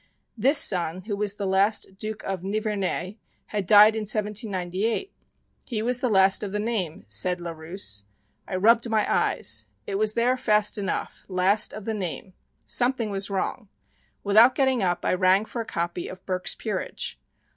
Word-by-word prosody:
This 265 +7 +4
son 180 -5 +2
who 205 +2 -4
was 205 0 0
the 205 - -4
last 195 +1 +1
Duc 215 0 -4
of 190 -2 -4
Nivernais, 205 -1 -2 0.3
had 205 -4 -4
died 210 +1 +8
in - - -1
1798! 210 - -2 0.6
"He 225 -5 -2
was 245 +1 0
the 250 - +1
last 190 -2 +4
of 205 -2 -4
the 210 - -2
name," 205 -7 -3
said 180 -1 +2
Larousse. 160 - -6 0.4
I 185 - -4
rubbed 230 +5 +3
my 220 -1 +2
eyes. - - 0 0.2
It 195 0 -3
was 215 0 +1
there 245 +2 +2
fast 210 -4 +1
enough 195 - -4
"last 190 +3 +3
of 215 -1 -9
the 225 - -2
name." 190 -1 -5 0.3
Something 245 -3 +1
was 195 0 -2
wrong. 200 +2 -3 0.5
Without 220 +5 +6
getting 265 -3 +2
up 175 -2 -1
I - - +2
rang 185 +3 +3
for 235 - -5
a - - -6
copy 170 -2 -3
of 185 - -11
"Burke's 185 -1 -2
Peerage." - - -5
205 Hz, 165 wpm, -25 LUFS, 185-220 Hz, 0.6 s, died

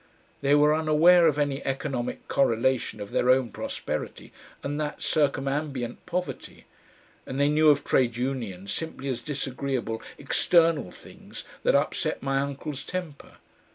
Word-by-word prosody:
They 140 +1 +4
were 150 +1 +5
unaware 160 +3 +5
of 150 -2 +1
any 145 -2 -1
economic 135 -2 -3
correlation 130 -2 +1
of 100 -1 -7
their 125 - +1
own 130 -3 +3
prosperity - - -5 0.3
and 145 +2 -2
that 150 -1 -4
circumambient 140 -3 -1
poverty, 180 +1 -5 0.6
and 130 - -4
they 140 0 +4
knew 155 +1 +5
of 145 -1 +4
Trade 120 -3 +1
Unions 115 -7 -3
simply 160 -4 -5
as 120 -2 -2
disagreeable 130 -4 -3 0.2
external 165 - +2
things - - -12 0.2
that - - +3
upset - - 0
my 135 0 +1
uncle's 140 +1 -4
temper. 180 -6 -6
140 Hz, 135 wpm, -26 LUFS, 130-150 Hz, 0.6 s, were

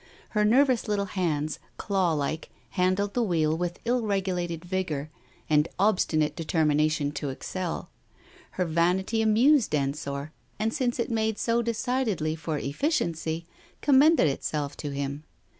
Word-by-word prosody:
Her 210 -1 +1
nervous 255 +2 +3
little 205 -1 0
hands, 155 -5 -1 0.2
clawlike, 165 -6 0 0.2
handled 185 +3 +1
the 245 - +1
wheel 160 -7 +1
with 175 +1 -2
ill 245 +1 +2
regulated 180 -5 -2
vigour 165 -6 -2 0.4
and 150 0 +3
obstfnate 160 -7 +2
determination 155 -2 +1
to 145 -1 -4
excel. 175 +6 -4 0.6
Her 180 - 0
vanity 180 +6 +1
amused 225 - +4
Ensor, 140 +1 -2 0.3
and 220 +1 0
since 255 -4 0
it 235 - -1
made 220 -1 0
so 230 +2 +1
decidedly 230 -8 -1
for 160 -2 -3
effici 275 - 0
ency, 165 0 -3 0.4
commended 290 - +5
itself 145 +1 -2
to 145 - -4
him. 140 +1 -4
175 Hz, 130 wpm, -27 LUFS, 155-220 Hz, 0.6 s, commended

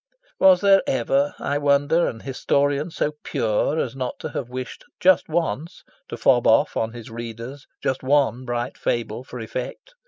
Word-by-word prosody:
Was 185 -2 +6
there 195 -1 +6
ever, 135 +3 +1
I 145 +1 -1
wonder, 145 +4 +3
an 115 - -5
historian 140 +3 0
so 150 -2 -1
pure 110 +7 0
as 130 -5 -2
not 130 -2 -4
to - - -4
have 125 - -5
wished 130 0 -6 0.2
just 185 -2 +4
once 165 0 -2 0.3
to - - -5
fob - - +3
off - - +4
on 115 0 -1
his 120 0 -10
readers 115 +4 -8 0.2
just 130 0 -1
one 135 -2 +2
bright 120 0 -4
fable 120 0 -2
for 125 -1 -9
effect? 125 - -6
135 Hz, 165 wpm, -23 LUFS, 120-145 Hz, 0.3 s, Was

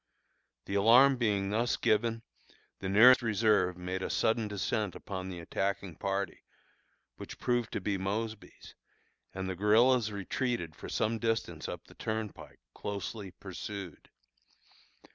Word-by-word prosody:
The - - -5
alarm 120 +7 +6
being 100 -4 0
thus 115 +3 +1
given, 115 +1 +1 0.6
the 95 - -3
nearest 120 +7 +8
reserve 105 -5 +2
made 90 +1 -4
a - - -3
sudden 110 -1 +1
descent 105 -1 -2
upon 95 -1 -6
the 90 - -6
attacking 95 0 -3
party, 100 -2 -3 0.7
which - - -9
proved 120 -2 0
to - - -2
be 100 0 -1
Mosby's, 110 +3 -5 0.6
and 95 0 -4
the 95 - -2
guerillas 110 +4 +4
retreated 100 - -2
for - - -9
some 110 +1 0
distance 115 0 -2
up - - -7
the - - -16
turnpike, 110 - -5
closely 100 0 -5
pursued. 95 -1 -8
105 Hz, 130 wpm, -31 LUFS, 95-115 Hz, 0.7 s, nearest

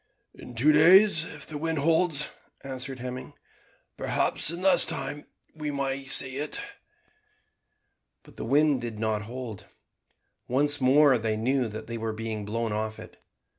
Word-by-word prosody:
"In 125 - -12
two 140 +7 +4
days 170 +2 +5
if 150 -4 -10
the 150 -1 -7
wind 160 +1 -2
holds," 160 0 +1 0.3
answered 135 0 -6
Hemming; 125 +1 -7 0.6
"perhaps - - 0
in 170 +3 -4
less 190 - +7
time 145 -2 -3 0.3
we 150 -1 -5
may 140 -1 -3
sight 130 0 +5
it." 145 +3 -4 1.6
But - - -18
the - - -7
wind 145 +1 +2
did 115 -2 -6
not 110 -1 -1
hold. 120 -5 -8 0.8
Once 145 +3 +1
more 135 0 +4
they 110 -1 -2
knew 125 +2 0
that 110 0 -8
they 115 0 -6
were 110 0 -3
being 110 -1 -5
blown 115 +1 -3
off 110 0 -3
it. - - -13
135 Hz, 150 wpm, -26 LUFS, 115-150 Hz, 1.6 s, less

